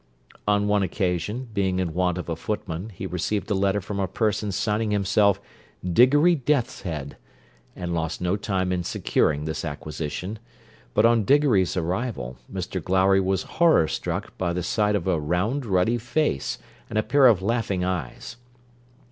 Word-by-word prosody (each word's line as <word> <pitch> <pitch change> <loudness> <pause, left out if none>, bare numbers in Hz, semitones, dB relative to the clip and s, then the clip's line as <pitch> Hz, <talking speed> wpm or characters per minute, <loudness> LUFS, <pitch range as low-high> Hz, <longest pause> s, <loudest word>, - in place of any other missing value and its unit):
On 105 0 +2
one 105 0 +3
occasion, 100 +6 -2
being 95 -2 0
in 90 -3 -1
want 90 0 +1
of 90 - -5
a 85 - -2
footman, 95 +1 -4
he 95 - -7
received 95 +4 -2
a - - +4
letter 100 +1 +1
from 100 +1 -5
a 95 - 0
person 105 +1 -1
signing 105 +3 0
himself 100 0 +3 0.5
Diggory 135 - +5
Deathshead, 100 - -2 0.6
and 90 -1 -4
lost 80 -1 -2
no 90 +2 0
time 95 -2 -1
in 90 -1 -1
securing 75 -2 0
this 80 0 -3
acquisition; 80 +6 -5 0.6
but 105 - +5
on 115 -1 +4
Diggory's 120 -8 +3
arrival, 90 - -2
Mr - - -4
Glowry 95 +1 +3
was 95 0 0
horror 165 - +3
struck - - -4
by 85 -2 0
the 90 0 -2
sight 105 +4 +1
of 100 - -1
a 90 -4 +1
round 100 - -1
ruddy 100 +5 +2
face, 120 - -1 0.3
and 110 - -3
a 110 - +2
pair 140 +1 +5
of 100 -6 +4
laughing 105 -4 0
eyes. 90 - -4
95 Hz, 160 wpm, -25 LUFS, 90-110 Hz, 0.6 s, Diggory